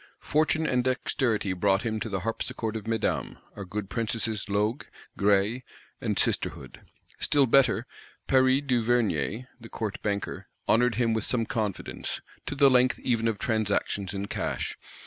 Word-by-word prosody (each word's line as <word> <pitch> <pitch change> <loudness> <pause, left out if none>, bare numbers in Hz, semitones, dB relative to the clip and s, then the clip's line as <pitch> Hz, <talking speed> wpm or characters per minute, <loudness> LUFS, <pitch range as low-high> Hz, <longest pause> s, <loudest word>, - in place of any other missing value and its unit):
Fortune 155 +2 +1
and 125 -4 +2
dexterity 120 -5 0
brought 95 +2 +2
him 110 -2 -1
to 110 - -4
the 95 -3 -2
harpsichord 115 +1 -3
of 110 -1 -5
Mesdames, 115 -1 -1 0.2
our 100 - -6
good 100 +2 -4
Princesses 110 -1 -2
Loque, 105 +5 0 0.3
Graille 100 +4 +2 0.4
and - - -1
Sisterhood. - - -1 0.4
Still 145 -2 +3
better, 125 -2 +4 0.4
Paris 130 +1 +4
Duvernier, 120 - +1
the 115 -1 -11
Court 110 -3 -4
Banker, 100 -1 -3 0.2
honoured 120 +1 +3
him 115 -1 +2
with 110 -1 0
some 115 -3 +2
confidence; 105 -4 -3 0.3
to - - -3
the 140 -1 +6
length 125 0 +4
even 115 -2 0
of 110 -2 0
transactions 100 -3 0
in 100 0 -3
cash. - - -3
115 Hz, 145 wpm, -27 LUFS, 105-125 Hz, 0.4 s, the